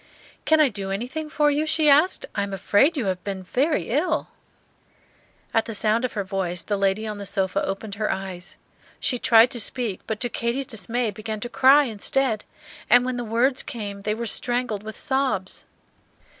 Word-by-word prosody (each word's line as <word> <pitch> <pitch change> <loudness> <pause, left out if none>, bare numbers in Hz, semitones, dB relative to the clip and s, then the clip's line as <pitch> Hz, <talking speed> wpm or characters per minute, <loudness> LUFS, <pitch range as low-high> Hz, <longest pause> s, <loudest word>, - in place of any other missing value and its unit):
"Can 315 0 +4
I 300 -3 +5
do 200 -3 -5
anything 250 +10 -4
for 295 0 +2
you?" 300 +2 0
she 310 0 +2
asked. 300 +6 +4
"I 200 - -1
am 200 -1 -3
afraid 205 - +2
you 250 - -1
have 185 -2 -2
been 195 -2 -5
very 255 - 0
ill." 300 +8 0 1.2
At 225 - +2
the 225 - -5
sound 220 +3 +1
of 255 - -2
her 205 - -2
voice 185 -2 -3
the 205 - -1
lady 195 +2 0
on 210 -1 -5
the 200 - -6
sofa 190 +1 0
opened 195 +2 -4
her 215 - +1
eyes. 190 -2 -6 0.4
She 250 - -1
tried 230 +1 +5
to 240 - -2
speak, 225 -3 0
but 220 -1 -3
to 245 - +2
Katy's 235 +3 -2
dismay 225 +1 -2
began 215 +1 -5
to 240 - -4
cry 270 +4 +6
instead; 230 0 0 0.5
and 245 0 +6
when 255 -1 -2
the 245 - -3
words 240 +4 +1
came 205 -4 -6
they 210 +1 -1
were 235 +1 -4
strangled 240 -2 -1
with 220 0 -8
sobs. 260 -9 -1
225 Hz, 190 wpm, -24 LUFS, 200-255 Hz, 1.2 s, cry